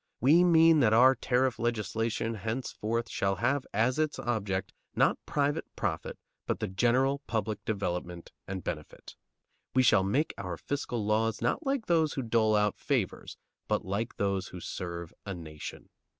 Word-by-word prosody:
We 155 +8 +6
mean 165 -2 +6
that 110 -5 +4
our 130 +4 +7
tariff 130 -2 0
legislation 115 0 -1
henceforth 115 +1 -3
shall 95 0 0
have 125 +7 0
as 115 +7 +1
its 155 -1 0
object, 100 -5 -2 0.2
not - - +2
private 145 +2 0
profit, - - -3 0.3
but - - -1
the - - -2
general 125 +8 +2
public 110 -2 -2
development 90 -4 -3 0.2
and 95 -2 -5
benefit. - - -7 0.6
We 130 - +5
shall 100 - +5
make 130 +11 0
our 90 -3 -4
fiscal 125 -6 -3
laws, 110 +1 +1
not 325 - -1
like 270 -4 0
those 160 -3 +2
who 135 - -3
dole 110 -2 +2
out 105 -1 +1
favors, - - -2 0.3
but - - 0
like 100 +5 -2
those 100 -2 0
who 90 - -9
serve 85 -1 -6
a 100 -2 -5
nation. 80 -3 -9
115 Hz, 155 wpm, -30 LUFS, 100-130 Hz, 0.6 s, our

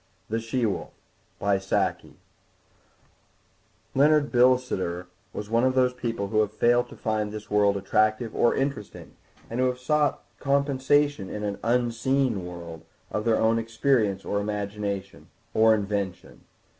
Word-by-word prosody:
THE 115 +1 0
SHE 115 +2 -1
WOLF 105 - -3 3.0
Leonard 145 +1 +4
Bilsiter 125 -8 +2 0.3
was 105 - -6
one 115 +1 +3
of 130 0 +2
those 125 -1 +3
people 115 -5 -3
who 110 - +1
have 105 -1 +2
failed 120 +3 +2
to - - -11
find 110 -1 -2
this 105 0 -8
world 100 -1 +3
attractive 110 +3 +1
or 120 - +3
interesting, 135 -6 -4 0.4
and 115 - -4
who 130 - +3
have 125 0 -1
sought 150 +3 +1 0.2
compensation 140 -4 +1
in 105 - -5
an 100 -1 -3
"unseen 120 -1 +1
world" 85 -2 -8 0.3
of 105 - -2
their 115 -1 +3
own 115 +1 +3
experience 115 -3 0
or 100 - -1
imagination—or 105 +1 -1
invention. 100 -3 -4
115 Hz, 130 wpm, -26 LUFS, 105-130 Hz, 3.0 s, Leonard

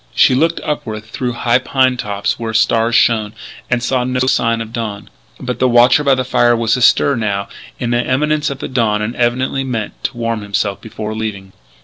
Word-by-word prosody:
She - - +5
looked 165 +6 +1
upward 110 -8 -4
through 120 +3 -4
high 120 +1 +2
pine 130 0 +1
tops 105 +1 -3
where 110 -1 -4
stars 115 +1 +2
shone; 110 -3 +2 0.4
and 120 -1 0
saw 125 0 0
no 125 0 -1
sign 115 -3 +1
of 115 0 -7
dawn. 110 -4 -5 0.3
But 125 -1 -4
the 130 - +3
watcher 120 +4 +5
by 140 -2 +4
the 130 0 -2
fire 120 -1 +2
beyond 115 - -1
was 115 +1 +2
astir, 130 +3 +3
now, 100 -3 -2 0.3
in 120 -1 -2
the 120 +1 +1
imminence 150 +4 0
of 140 - -5 0.2
dawn, 105 -4 +1
and 115 +3 -4
evidently 130 +3 0
meant 115 -5 -5
to 125 - -3
warm 115 -2 -2
himself 100 0 -2
before 110 -1 -6
leaving. 105 -3 -5
120 Hz, 200 wpm, -16 LUFS, 110-130 Hz, 0.4 s, She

